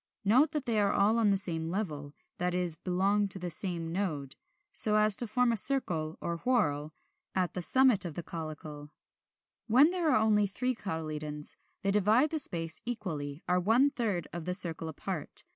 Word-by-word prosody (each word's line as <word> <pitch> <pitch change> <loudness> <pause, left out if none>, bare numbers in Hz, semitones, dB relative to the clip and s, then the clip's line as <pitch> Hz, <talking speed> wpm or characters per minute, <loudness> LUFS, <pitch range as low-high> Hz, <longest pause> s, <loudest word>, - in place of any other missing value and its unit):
Note 255 +10 +3
that 300 -4 -4
they 225 -3 -1
are 200 -1 +1
all 215 +3 +1
on 220 -2 +2
the 200 - +2
same 165 -4 +2
level, 155 -7 -5 0.2
that 180 0 -2
is, 175 -3 +1
belong 195 +4 -1
to 195 - -4
the 180 -1 -4
same 170 -1 0
node, 155 -8 -4 0.4
so 210 -1 +3
as 215 -1 +7
to 240 - 0
form 245 +3 0
a - - -1
circle 175 - +2
or 170 0 -4
whorl 155 - -1 0.4
at 185 -2 -1
the 180 - -4
summit 255 +2 +6
of 170 -4 -7
the 175 - -6
caulicle. 155 -3 -9 0.8
When 265 +8 +4
there 355 -3 -1
are - - +3
only 215 -1 +1
three 250 +6 -3
cotyledons, 155 -7 -3 0.3
they 195 - 0
divide 215 +8 +2
the 315 - -1
space 165 - 0
equally, 165 -11 -6
are 180 0 +1
one 235 +10 +2
third 215 - -3
of 170 -2 -7
the 180 0 -1
circle 165 -4 +3
apart. 160 - -6
190 Hz, 185 wpm, -29 LUFS, 165-220 Hz, 0.8 s, as